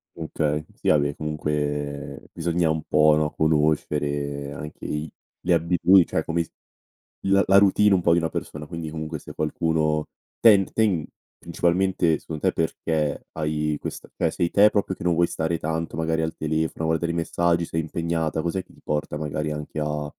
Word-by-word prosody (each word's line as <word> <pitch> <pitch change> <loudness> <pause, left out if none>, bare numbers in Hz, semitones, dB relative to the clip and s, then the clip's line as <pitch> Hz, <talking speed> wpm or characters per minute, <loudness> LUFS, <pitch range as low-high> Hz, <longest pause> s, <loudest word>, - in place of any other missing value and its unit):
Okay, 75 -2 -2
sì - - -7
vabbè 70 -1 +3
comunque 75 -2 -3
bisogna 85 -1 +1
un 80 0 -1
po', 75 0 +5
no, 75 0 +1
conoscere 75 -2 0
anche 75 +2 -8
i 75 +1 -3 0.3
le 90 - +2
abitu 90 +3 +5
cioè 80 - -2
come 85 +1 0
s - - -19 0.7
la 100 0 +4
la 95 - +6
routine 100 +1 +5
un 95 - +3
po' 85 -1 +4
di 85 - +4
una 80 -1 -1
persona 75 0 -5
quindi 80 0 -6
comunque 80 0 -5
se - - -11
qualcuno 80 0 0 0.3
tend 100 -4 +6
ten 100 -8 +1 0.3
principalmente 85 -1 +1
secondo 80 -2 -7
te - - -3
perché 80 -2 -1
hai 75 -1 -1
questa - - -7
cioè - - +1
sei 85 - 0
te 105 +1 +6
proprio 100 -2 -1
che - - -9
non 90 -1 +2
vuoi 85 +1 +3
stare 80 +1 -1
tanto 80 -1 -3
magari 80 0 0
al 80 0 -2
telefono 80 +1 -1
a - - 0
guardare 85 +1 0
i - - -4
messaggi, 85 0 +1
sei 80 0 -2
impegnata, 80 0 -2
cos'è 85 +3 -2
che - - -22
ti - - -21
porta 75 0 -2
magari 75 0 -3
anche 75 +1 -5
a 75 0 -2
80 Hz, 180 wpm, -24 LUFS, 75-85 Hz, 0.7 s, la